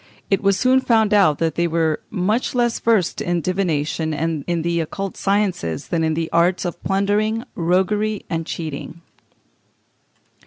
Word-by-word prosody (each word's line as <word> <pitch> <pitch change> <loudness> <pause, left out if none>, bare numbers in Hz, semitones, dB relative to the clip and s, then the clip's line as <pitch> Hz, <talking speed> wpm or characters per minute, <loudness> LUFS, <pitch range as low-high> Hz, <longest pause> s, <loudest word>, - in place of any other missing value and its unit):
It 195 - +3
was 195 -1 +2
soon 255 +4 +4
found 220 -4 +2
out 185 -8 +4
that 165 -2 0
they 170 +2 +1
were 160 -2 0
much 210 +8 -1
less 240 -1 +1
versed 220 -7 +1
in 175 0 0
divination 160 -3 -1
and 160 -1 -2
in 170 -2 -1
the 170 0 0
occult 195 +4 -4
sciences 195 - -1
than 165 -2 0
in 160 -1 +1
the 165 0 -1
arts 175 +2 +2
of 175 - -5
plundering, 205 +3 0
roguery, 195 +5 0
and 165 -2 -2
cheating. 160 0 -6
180 Hz, 155 wpm, -21 LUFS, 165-205 Hz, -, soon